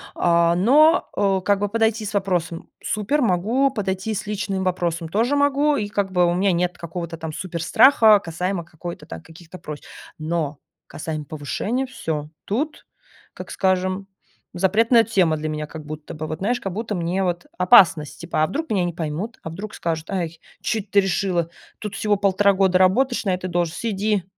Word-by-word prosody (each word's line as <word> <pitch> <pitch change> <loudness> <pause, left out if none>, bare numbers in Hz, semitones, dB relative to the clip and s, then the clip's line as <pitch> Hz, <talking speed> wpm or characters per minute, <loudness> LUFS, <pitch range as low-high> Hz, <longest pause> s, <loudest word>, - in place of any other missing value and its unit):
а, 170 -1 +3
но, 295 - +5
э, 195 -2 +2
как 200 0 +3
бы 205 0 -1
подойти 225 0 +1
с 210 - -5
вопросом- 180 -4 -1 0.2
супер, 215 +8 0
могу; 230 +6 +2
подойти 195 -2 -2
с 205 0 -4
личным 200 -2 -2
вопросом- 175 -2 -1
тоже 230 - +1
могу, 285 +1 +2
и 210 -2 -2
как 200 -1 -2
бы 180 -1 +3
у 175 - +2
меня 190 +2 +2
нет 180 0 0
какого-то 170 0 -6
там 160 -1 -5
суперстраха 205 - +4
касаемо 180 0 -3
какой-то 170 +1 -8
там 80 0 -8
каких-то 165 +2 -13
просьб. 150 -1 -8 0.3
Но 155 -2 -2 0.3
касаемо 155 0 -5
повышения, 160 - -3
всё, 160 - -4
тут, 285 +10 -3 0.5
как - - -9
скажем, 185 0 0 0.5
запретная 225 +6 +4
тема 190 -8 +2
для 155 +1 -3
меня, 150 0 -3
как 155 0 -9
будто 155 0 -8
бы 155 0 -5
вот, 155 0 -5
знаешь, 240 +6 0
как 195 -5 -5
будто 220 +1 -3
мне 175 +2 -1
вот 175 -1 -2
опасность 170 -4 +5
типа: 170 -2 -1
а - - +2
вдруг 320 - -4
меня 195 -4 +1
не 175 -1 -2
поймут? 170 +7 -4
A 160 - -5
вдруг 200 +6 -7
скажут: 165 -1 -3
"Ай, 170 -4 -3 0.2
чё 225 - 0
эт 200 - -10
ты 200 - +5
решила?" 180 -3 0 0.3
Тут 210 -2 -6
всего 210 0 +1
1,5 200 0 +3
года 190 -1 +3
работаешь 240 +8 +3
на 190 - +2
этой 180 0 -3
должности- 175 +5 -1
сиди! 205 -1 0
185 Hz, 180 wpm, -22 LUFS, 170-210 Hz, 0.5 s, но